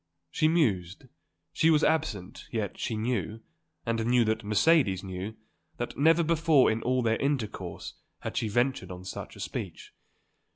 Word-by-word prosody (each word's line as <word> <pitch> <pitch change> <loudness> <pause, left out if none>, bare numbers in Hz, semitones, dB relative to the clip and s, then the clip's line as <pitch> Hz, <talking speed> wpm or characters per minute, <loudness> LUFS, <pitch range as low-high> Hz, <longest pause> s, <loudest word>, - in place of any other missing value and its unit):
She 155 - +2
mused, 110 - +1 0.5
she 160 - +3
was 155 -1 +4
absent, 105 - -1
yet 110 -3 -3
she 110 - -2
knew, 110 -2 -2 0.4
and 115 -1 0
knew 120 -1 +4
that 110 +1 0
Mercedes 105 - +3
knew, 95 +3 -6 0.4
that 120 - -4
never 165 +3 +4
before 160 -5 +4
in 110 +1 -2
all 125 +1 +1
their 115 0 +2
intercourse 140 -6 -3 0.3
had - - -5
she 110 - 0
ventured 120 -3 0
on 90 0 -8
such 95 - -7
a - - -13
speech. - - -6
115 Hz, 155 wpm, -28 LUFS, 105-145 Hz, 0.5 s, was